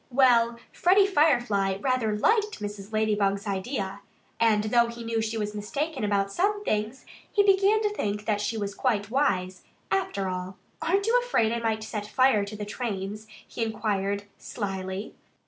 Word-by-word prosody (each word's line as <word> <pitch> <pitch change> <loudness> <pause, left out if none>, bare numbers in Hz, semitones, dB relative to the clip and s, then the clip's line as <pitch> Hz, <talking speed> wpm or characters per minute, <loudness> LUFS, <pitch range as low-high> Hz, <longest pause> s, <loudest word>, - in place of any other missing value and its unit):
Well, 240 -3 +4 0.2
Freddie 390 +3 +4
Firefly 240 - +2
rather 230 -3 0
liked 425 - +2
Mrs. 205 0 -6
Ladybug's 205 -2 +1
idea. 195 0 -3 0.4
And 220 -2 +3
though 235 +2 +3
he 235 0 -7
knew 230 0 -2
that 220 - +1
she 225 +1 -3
was 210 -1 -2
mistaken 275 +7 -3
about 200 -1 +1
some 410 - 0
things, 215 +5 -2 0.3
he 405 - +4
began 400 +2 +4
to 420 - +2
think 205 - -2
that - - -20
perhaps 210 -1 0
she 225 - -2
was 200 -1 -3
quite 215 -3 -1
wise, 185 -9 0 0.3
after 195 0 0
all. 185 +1 -5 0.2
"Aren't 390 +4 +1
you 475 +3 +4
afraid 230 - +1
I 235 - -1
might 220 -1 -1
set 210 -1 -5
fire 255 -3 +3
to 205 +1 -8
the 210 0 -5
trains?" 210 -1 -4 0.2
he 230 - -3
inquired 205 -2 -1 0.2
slyly. 195 -1 -5
215 Hz, 170 wpm, -27 LUFS, 200-255 Hz, 0.4 s, Well